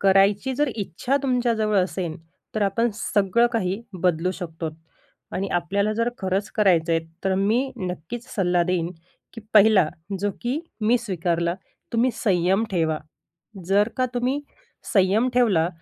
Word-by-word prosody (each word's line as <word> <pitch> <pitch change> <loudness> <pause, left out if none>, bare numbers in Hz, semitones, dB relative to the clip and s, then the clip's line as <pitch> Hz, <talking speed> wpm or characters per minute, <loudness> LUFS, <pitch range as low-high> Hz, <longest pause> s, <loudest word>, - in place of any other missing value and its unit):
करायची 200 +6 +3
जर 295 +1 +1
इच्छा 220 - -1
तुमच्याजवळ 235 -5 +1
असेल 180 -3 -1 0.4
तर 215 - 0
आपण 225 +4 +1
सगळं 210 +2 +2
काही 195 -2 -1 0.2
बदलू 180 0 +2
शकतो. 165 -3 -5 0.6
आणि 195 +1 -2
आपल्याला 200 +5 0
जर 230 +2 0
खरंच 190 +1 -1
करायचं 170 -6 +3
आहे. 165 - +3 0.2
तर 190 0 +2
मी 225 +8 +1
नक्कीच 185 +4 -5
सल्ला 180 -3 +2
देईन, 175 -1 0 0.4
की 230 - -9
पहिला 205 -5 +6 0.3
जो 205 0 +1
की 250 +5 0 0.2
मी 235 +3 +3
स्वीकारला, 170 -5 -1 0.4
तुम्ही 240 +2 +3
संयम 190 +1 +2
ठेवा. 160 -4 +1 0.7
जर 205 +3 +3
का 255 -1 +2
तुम्ही 255 +4 0 0.5
संयम 200 +5 +3
ठेवला 195 -10 +3
195 Hz, 135 wpm, -24 LUFS, 180-230 Hz, 0.7 s, पहिला